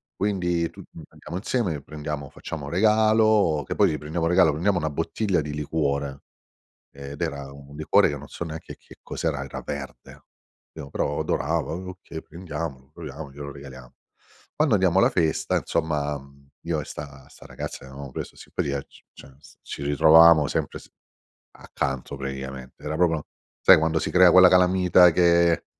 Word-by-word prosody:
quindi 90 -4 -1
tutti - - -14 0.2
andiamo 85 +3 -8
insieme 100 -5 -1
e 70 - -7
prendiamo 75 -1 -6
facciamo 75 -3 -7
regalo, 110 -4 +3
che - - -3
poi 100 -5 +4
le 75 - -2
prendiamo 80 +2 -3
un 85 - +1
regalo, 90 -3 +5
prendiamo 90 +5 0
una 80 -2 -1
bottiglia 85 +5 -1
di 75 0 -6
liquore 70 -2 -2 0.7
ed 70 +2 -10
era 70 -4 -4
un 70 +1 -13
liquore 75 - +3
che 75 - -3
non 70 +1 -10
so - - -8
neanche 80 0 -8
che - - -17
cos'era, 75 -4 -3
era 65 - -7
verde, 65 -4 -8 0.5
pi 80 -3 -8
però 75 - -2
adorava, 80 +4 -1
"okay, 90 -3 -8
prendiamolo, 75 -5 -7
proviamo, 75 -3 -8
glielo 70 0 -8
regaliamo". 65 -3 -12 0.6
Quando 150 -7 +3
andiamo 95 -2 +3
alla - - +5
festa, 80 -3 0
insomma, 75 -3 -2
mhmm, 70 0 -19
io 80 -2 -2
e - - -6
'sta 70 -2 -10
'sta - - -15
ragazza - - -7
che - - -14
avevamo 70 0 -9
preso - - -7
simpatia, 70 -1 -4
c - - -21
cioè, 65 - -15 0.3
ci - - -7
ritrovavamo 80 +1 +6
sempre - - -3
s - - -17 0.7
accanto 65 0 -4
praticamente, 65 -1 -7
era 75 +1 -3
proprio, 80 -3 +1 0.4
sai, - - +8
quando 80 +1 +1
si - - -3
crea 90 -1 +6
quella 90 +1 +8
calamita 90 -1 +5
che 85 -1 +3
80 Hz, 165 wpm, -24 LUFS, 70-90 Hz, 0.7 s, sai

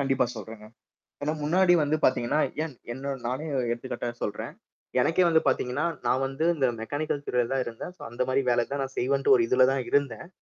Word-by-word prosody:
கண்டிப்பா 135 -2 +2
சொல்றங்க. 110 0 -9 0.6
ஏனா 150 +2 0
முன்னாடி 175 +3 +4
வந்து 150 +1 +1
பாத்தீங்கன்னா, 130 +3 +2 0.2
ஏன் 155 -5 -6 0.2
என்ன 135 +2 -4
நானே 130 +6 -3 0.2
எடுத்துக்காட்டா 120 0 -4
சொல்றேன். 105 - -4 0.5
எனக்கே 180 +3 +3
வந்து 160 -1 +4
பாத்தீங்கன்னா, 130 +3 0 0.2
நான் 130 +2 +2
வந்து 140 +4 -2
இந்த 135 -4 +2
மெக்கானிக்கல் 145 +3 -3
துறைல 120 -1 +1
தான் 130 -1 +1
இருந்தன். 120 +9 -7
சோ - - -17
அந்த 120 +2 -1
மாரி 135 +1 +2
வேலை 120 -1 +2
தான் 140 -1 -1
நான் 135 0 -7
செய்வேன் 135 +2 +3
ஒரு 120 - +3
இதுல 130 +1 +5
தான் 135 -1 0
இருந்தன். 140 +2 0
135 Hz, 185 wpm, -27 LUFS, 125-145 Hz, 0.6 s, இதுல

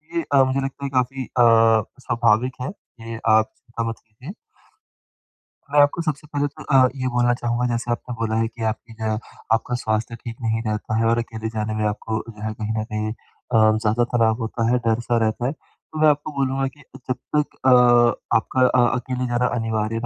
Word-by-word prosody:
ये 170 - +1
अ, 135 - +7
मुझे 130 +1 0
लगता 135 +1 -5
है - - -2
काफ़ी 130 +1 -2
अ, - - -18 0.8
स्वाभाविक 120 +2 +1
है। 130 - -3 0.3
ये 115 0 -6
आप 110 0 +5
चिंता 120 -1 -6
मत 115 - -4
कीजिए। 125 - -11 1.4
मैं 145 - +4
आपको 145 +4 +2
सबसे 155 -2 -3
पहले 145 -1 -1
तो 140 - -12
अ, 130 -3 +4
ये 130 -1 -2
बोलना 120 0 +3
चाहूँगा 120 0 -1
जैसे 120 0 -2
आपने 120 +1 -3
बोला 110 -1 -1
है 115 - +1
कि 115 0 -8
आपकी 115 +1 -11
जो 110 0 -9
है 110 - 0 0.4
आपका 115 +2 0
स्वास्थ्य 110 +1 -1
ठीक 115 0 -8
नहीं 115 -1 0
रहता 110 +1 -2
है 115 - +2
और 115 +1 +3
अकेले 110 -1 -4
जाने 110 0 -2
में 110 - -1
आपको 110 +1 -3
जो 105 -2 -12
है 110 0 -2
कहीं 110 0 -4
न 110 - -1
कहीं 110 0 -3
अ, 110 -1 0
ज़्यादा 110 +2 +1
तनाव 115 -2 +3
होता 115 0 -2
है 125 - +3
डर-सा 120 +1 +1
रहता 110 +2 -1
है। - - 0
तो 155 +1 -13
मैं 155 - +6
आपको 150 +1 0
बोलूँगा 135 -1 0
कि 145 +2 -12 0.3
जब 130 - +1 0.2
तक 150 -1 0
अ 130 - +6 0.6
आपका 130 +3 +1
अ 125 -1 +4
अकेले 125 0 -3
जाना 120 0 +1
अनिवार्य 115 -1 -1
120 Hz, 205 wpm, -22 LUFS, 110-130 Hz, 1.4 s, अ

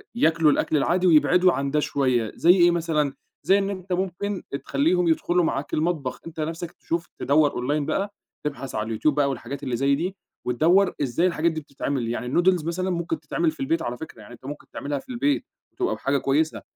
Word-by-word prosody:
ياكلوا 160 -7 +4
الأكْل 155 - +1
العادي 180 +6 +2
ويبعِدوا 180 +2 +5
عن 140 0 -2
ده 150 - +2
شوية، 130 -7 0
زي 170 - +5
إيه 175 -2 +5
مثلًا، 160 -4 0 0.3
زي 195 - +5
إن 200 0 0
أنت 185 -2 -4
ممكن 190 +2 -2
أ - - 0
تخلّيهم 160 +6 +1
يدخُلوا 175 +2 +2
معاك 140 -3 -2
المطبخ، 155 -5 -1
أنت 165 -1 -9
نَفسك 165 +2 -3
تشوف، 170 0 -4
تدوّر 145 0 +3 0.2
online 150 +2 +1
بقى، 200 +6 -2 0.3
تبحث 140 -2 -4
على 105 - -1
اليوتيوب 115 +6 +1
بقى 145 -1 +2
والحاجات 135 +1 -5
اللي 130 -3 -1
زي 140 +3 +2
دي 180 +6 -3 0.3
وتدوّر 170 +10 +3
إزاي 145 +6 +1
الحاجات 170 -1 +1
دي 160 0 -4
بتتعمل، 140 -3 -3
يعني 120 +1 -3
الnoodles 175 +4 +2
مثلًا 185 +3 -1
ممكن 170 -3 -2
تتعمل 160 +2 0
في 155 - -17
البيت 165 +5 0
على 120 +1 -3
فكرة، 155 -7 -10
يعني 105 +3 -12
أنت 120 - -15
ممكن 145 +2 -8
تعملها 145 0 -3
في - - -18
البيت، 285 +4 0 0.3
تبقى 370 -1 0
بحاجة 140 +1 0
كويسة، 150 +4 0
155 Hz, 200 wpm, -24 LUFS, 140-175 Hz, 0.3 s, ويبعِدوا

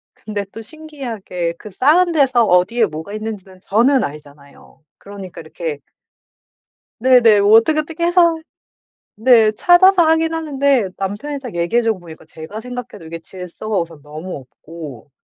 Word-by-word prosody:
근데 205 -1 -5
또 225 - -9
신기하게 225 - -6
그 210 - -11
쌓은 325 - +3
데서 265 -6 +3
어디에 215 +6 +3
뭐가 160 +6 -7
있는지는 210 -4 -7
저는 245 +8 +2
알잖아요. 145 +1 -11
그러니까 200 -2 -10
이렇게 155 -2 -6 1.2
네네. 235 -4 +5
뭐 205 +2 +4
어떻게 310 +7 +2
어떻게 325 +2 -3
해서 340 -2 +3 0.8
네 225 -2 +4
찾아서 355 - +5
하긴 325 0 +2
하는데 280 -8 +1
남편이 205 +10 -4
딱 245 -8 -8
얘기해 175 +8 +1
주고 225 -4 0
보니까 165 -2 -13
제가 160 +7 -9
생각해도 245 -6 -8
이게 165 +1 -7
질서가 185 +4 -6
우선 165 -3 -5
너무 155 +5 -8
없고 145 0 -11
215 Hz, 325 characters per minute, -18 LUFS, 175-275 Hz, 1.2 s, 네네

